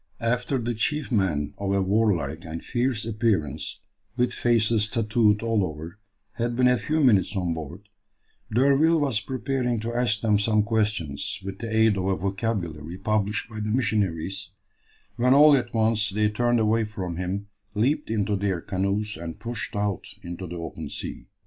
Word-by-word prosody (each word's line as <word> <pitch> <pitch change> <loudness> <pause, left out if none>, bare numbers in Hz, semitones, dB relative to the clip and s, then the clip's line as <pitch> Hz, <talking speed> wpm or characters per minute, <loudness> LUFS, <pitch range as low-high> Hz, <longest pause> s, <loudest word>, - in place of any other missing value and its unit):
After 125 +3 0
the 120 -1 -2
chief 145 +6 -1
men 90 - +1
of 100 -1 -1
a 100 - +2
warlike 95 -5 +1
and 80 0 -7
fierce 120 -3 0
appearance, 105 - -1 0.4
with 125 0 +1
faces 110 -2 +2
tattooed 110 -1 +2
all 115 -3 +2
over, 80 +3 -6 0.4
had 120 0 -1
been 125 +1 +4
a 125 -1 +3
few 155 0 0
minutes 105 -5 +4
on 90 -3 0
board, 80 +6 -8 0.6
D'Urville 140 +7 +4
was 135 -7 +1
preparing 130 -2 -1
to 115 +1 -3
ask 120 -3 +1
them 105 -3 +3
some 105 0 +3
questions, 105 -12 -1
with 95 0 -6
the 115 - -4
aid 110 -2 +3
of 95 - -1
a 95 0 +2
vocabulary 90 -4 -3
published 105 +1 0
by 110 -2 -8
the 105 0 -2
missionaries, 95 -5 -1 0.7
when 125 +2 +4
all 150 0 +8
at 120 -3 -1
once 110 -1 +2
they 105 +1 +1
turned 120 +2 +1
away 110 +1 +2
from 95 -5 -5
him, 95 +3 -3 0.3
leaped 135 +8 +1
into 105 -2 0
their 95 -2 -1
canoes 100 +4 -2
and 80 -1 -7
pushed 120 -2 -4
out 100 -2 -1 0.2
into 85 +2 -6
the 85 - -7
open 80 -2 -6
sea. - - -6
105 Hz, 170 wpm, -25 LUFS, 95-120 Hz, 0.7 s, all